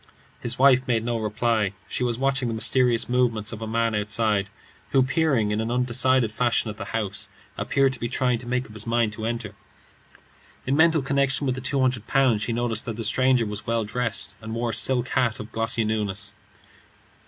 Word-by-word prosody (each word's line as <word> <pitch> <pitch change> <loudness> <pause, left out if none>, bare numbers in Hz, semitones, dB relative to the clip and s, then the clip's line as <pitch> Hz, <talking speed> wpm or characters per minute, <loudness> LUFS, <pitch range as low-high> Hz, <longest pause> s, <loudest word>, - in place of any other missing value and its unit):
His 120 +1 -4
wife 130 -1 +5
made 115 -2 0
no 120 -1 -1
reply. 110 -1 0
She - - -2
was 120 -2 -1
watching 135 -1 0
the 115 - -2
mysterious 120 +1 +3
movements 120 -4 +1
of 110 - -8
a 110 - -4
man 115 0 0
outside, 105 -1 0 0.4
who, 135 - +4
peering 130 -5 +1
in 105 +1 0
an 110 - -3
undecided 125 -1 +3
fashion 120 -1 0
at 105 - -12
the 100 - -6
house, 105 -2 -3 0.3
appeared 135 -1 +1
to 130 - -1
be 120 - -3
trying 125 -1 +1
to 120 - -8
make 125 +1 -1
up 110 - -14
his 110 +1 -7
mind 115 -2 +1
to 110 +1 -4
enter. 115 -3 -4 1.1
In 135 - +1
mental 160 -1 +4
connection 140 +1 0
with 130 - +1
the 130 - -6
two 135 +2 -1
hundred 125 -4 0
pounds, 130 -6 +2
she 115 - -2
noticed 115 -1 -1
that 115 - -4
the 115 - -4
stranger 130 +2 +3
was 105 0 -5
well 115 -1 0
dressed, 115 +1 -3
and 110 +1 -6
wore 115 0 -1
a - - -7
silk 130 -1 +1
hat 120 -4 0
of 110 - -8
glossy 115 +1 0
newness. 105 -1 -2
115 Hz, 205 wpm, -24 LUFS, 110-130 Hz, 1.1 s, wife